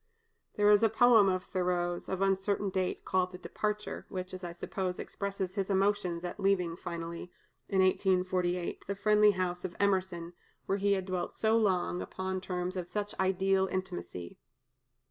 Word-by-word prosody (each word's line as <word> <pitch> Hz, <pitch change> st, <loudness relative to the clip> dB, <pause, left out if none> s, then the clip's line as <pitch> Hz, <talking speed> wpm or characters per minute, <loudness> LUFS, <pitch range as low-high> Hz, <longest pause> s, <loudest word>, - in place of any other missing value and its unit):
There 205 Hz, 0 st, +5 dB
is 205 Hz, 0 st, +6 dB
a 225 Hz, -, +5 dB
poem 225 Hz, -2 st, +6 dB
of 185 Hz, -1 st, 0 dB
Thoreau's, 175 Hz, -1 st, -1 dB
of 190 Hz, 0 st, 0 dB
uncertain 195 Hz, +1 st, +1 dB
date, 185 Hz, -1 st, -2 dB
called 185 Hz, -1 st, +1 dB
"The 180 Hz, -, -8 dB
Departure," 210 Hz, +2 st, -3 dB
which, 185 Hz, -2 st, -5 dB
as 185 Hz, 0 st, -7 dB
I 175 Hz, -, -4 dB
suppose, 180 Hz, +1 st, -3 dB
expresses 195 Hz, -2 st, -4 dB
his 195 Hz, -1 st, -2 dB
emotions 195 Hz, -3 st, +1 dB
at 175 Hz, -, -5 dB
leaving 180 Hz, -4 st, +1 dB
finally, 170 Hz, 0 st, -6 dB, 0.4 s
in 190 Hz, -1 st, +3 dB
1848, 185 Hz, -2 st, +1 dB
the 200 Hz, -, -2 dB
friendly 210 Hz, +1 st, +5 dB
house 180 Hz, -1 st, -2 dB
of 180 Hz, -2 st, -5 dB
Emerson, 185 Hz, -4 st, 0 dB, 0.3 s
where 195 Hz, -, 0 dB
he 200 Hz, +1 st, +3 dB
had 190 Hz, -2 st, -1 dB
dwelt 185 Hz, -2 st, -3 dB
so 220 Hz, 0 st, +2 dB
long, 185 Hz, -5 st, +1 dB
upon 185 Hz, 0 st, -4 dB
terms 180 Hz, 0 st, -3 dB
of 180 Hz, -1 st, -4 dB
such 205 Hz, -1 st, -3 dB
ideal 190 Hz, 0 st, +2 dB
intimacy. 180 Hz, -, -5 dB
185 Hz, 165 wpm, -31 LUFS, 180-200 Hz, 0.4 s, is